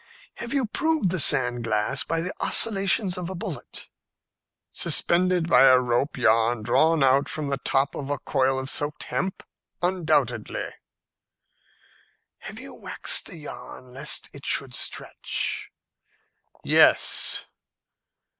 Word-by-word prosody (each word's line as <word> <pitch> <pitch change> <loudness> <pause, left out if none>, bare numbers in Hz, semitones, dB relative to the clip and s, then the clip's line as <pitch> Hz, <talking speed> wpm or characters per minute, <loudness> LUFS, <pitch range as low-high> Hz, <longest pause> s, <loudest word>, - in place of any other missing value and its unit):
"Have 235 - -6
you 275 -2 +1
proved 310 - 0
the 185 - -1
sand 125 -4 +3
glass 115 +3 0
by 165 0 -2
the 180 +2 -3
oscillations 195 -3 +2
of 175 -1 -5
a 190 - -6
bullet?" 170 - -7 0.8
"Suspended 180 -1 +1
by 135 - +6
a 130 -1 +7
rope 125 +3 -1
yarn 115 -1 +2
drawn 160 +6 +2
out 135 +1 +3
from 150 -2 -3
the 140 -1 -2
top 135 +1 0
of 140 -1 -6
a 145 - -1
coil 135 -1 0
of 130 0 -4
soaked 145 +2 -1
hemp? 190 0 -4 0.4
Undoubtedly." 155 - -1 1.7
"Have - - -9
you - - -9
waxed - - 0
the - - -9
yarn 130 -4 -10
lest 140 +4 -2
it 140 - -11
should 135 -2 0
stretch?" - - -2 0.9
"Yes." - - +3
145 Hz, 125 wpm, -24 LUFS, 130-180 Hz, 1.7 s, a